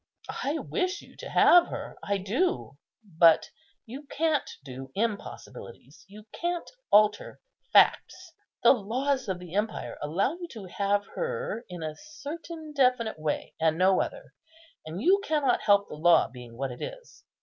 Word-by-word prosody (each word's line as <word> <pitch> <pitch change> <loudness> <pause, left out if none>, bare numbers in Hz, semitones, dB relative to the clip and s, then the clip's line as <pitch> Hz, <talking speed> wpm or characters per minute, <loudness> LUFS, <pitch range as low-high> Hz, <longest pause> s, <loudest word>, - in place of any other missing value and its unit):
I 290 +4 0
wish 370 +4 -2
you - - -17
to - - -8
have 350 -1 +6
her, - - -6
I 200 0 0
do; 200 - -1 0.2
but 170 -4 +4 0.3
you 270 +5 -9
can't 315 -1 0 0.2
do 130 0 -8
impossibilities—you 200 - -6
can't 345 0 -2 0.2
alter 215 - +3 0.3
facts. - - +3 0.3
The - - +8
laws 260 +4 0
of 190 -2 -1
the 180 -1 -11
empire 210 +2 -2
allow 170 - 0
you 345 0 -7
to 215 -5 -8
have 200 +2 0
her 485 - -3
in 175 -2 -7
a 155 -1 -4
certain 310 - -8
definite 250 - +2
way, 155 -1 -3
and 160 0 +2
no 185 +1 +4
other; - - -6 0.5
and 160 +3 -5
you 390 +3 +4
cannot 295 -7 +1
help 205 -1 +4
the - - -9
law 170 +3 +5
being 120 -2 -12
what 135 0 -3
it 125 - -10
is. - - -9
215 Hz, 150 wpm, -28 LUFS, -, 0.5 s, The